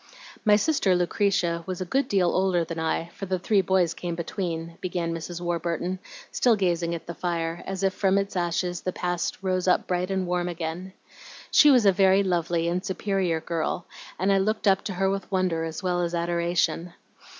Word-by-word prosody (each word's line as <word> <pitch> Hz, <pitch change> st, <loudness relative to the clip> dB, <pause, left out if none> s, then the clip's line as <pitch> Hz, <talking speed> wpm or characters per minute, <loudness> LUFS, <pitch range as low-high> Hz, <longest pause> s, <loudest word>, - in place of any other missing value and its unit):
"My 210 Hz, -2 st, +6 dB
sister 215 Hz, -, +2 dB
Lucretia 175 Hz, -1 st, +1 dB
was 185 Hz, -2 st, -4 dB
a 185 Hz, -, -3 dB
good 270 Hz, +8 st, 0 dB
deal 185 Hz, -6 st, +2 dB
older 185 Hz, -2 st, +2 dB
than 165 Hz, 0 st, -5 dB
I, 160 Hz, +1 st, -1 dB
for 195 Hz, -, -6 dB
the 185 Hz, 0 st, 0 dB
three 195 Hz, +2 st, +2 dB
boys 185 Hz, -2 st, +2 dB
came 175 Hz, -1 st, -4 dB
between," 170 Hz, -1 st, -4 dB
began 175 Hz, -2 st, -2 dB
Mrs. 165 Hz, +1 st, -5 dB
Warburton, 175 Hz, +1 st, -2 dB, 0.3 s
still 240 Hz, -3 st, +3 dB
gazing 170 Hz, -3 st, 0 dB
at 165 Hz, -, -8 dB
the 170 Hz, -, -6 dB
fire, 170 Hz, -1 st, -2 dB
as 195 Hz, 0 st, -4 dB
if 195 Hz, -1 st, +2 dB
from 195 Hz, 0 st, +2 dB
its 195 Hz, 0 st, -1 dB
ashes 175 Hz, 0 st, -1 dB
the 185 Hz, -, -3 dB
past 175 Hz, -1 st, -2 dB
rose 185 Hz, -1 st, 0 dB
up 180 Hz, -, +3 dB
bright 180 Hz, 0 st, -1 dB
and 190 Hz, -1 st, -1 dB
warm 180 Hz, 0 st, -1 dB
again. 175 Hz, +2 st, -5 dB, 0.6 s
"She 300 Hz, -, +7 dB
was 250 Hz, -6 st, +5 dB
a 200 Hz, -, +7 dB
very 190 Hz, +1 st, +4 dB
lovely 170 Hz, -2 st, 0 dB
and 180 Hz, +2 st, -1 dB
superior 190 Hz, -3 st, -1 dB
girl, 170 Hz, +1 st, -2 dB, 0.3 s
and 195 Hz, +2 st, +2 dB
I 195 Hz, -, +3 dB
looked 215 Hz, +2 st, 0 dB
up 195 Hz, 0 st, +4 dB
to 200 Hz, -, -3 dB
her 190 Hz, +1 st, +1 dB
with 195 Hz, +1 st, -2 dB
wonder 180 Hz, -4 st, 0 dB
as 160 Hz, +3 st, -6 dB
well 180 Hz, -1 st, 0 dB
as 175 Hz, 0 st, -1 dB
adoration. 170 Hz, 0 st, 0 dB
180 Hz, 195 wpm, -26 LUFS, 170-190 Hz, 0.6 s, She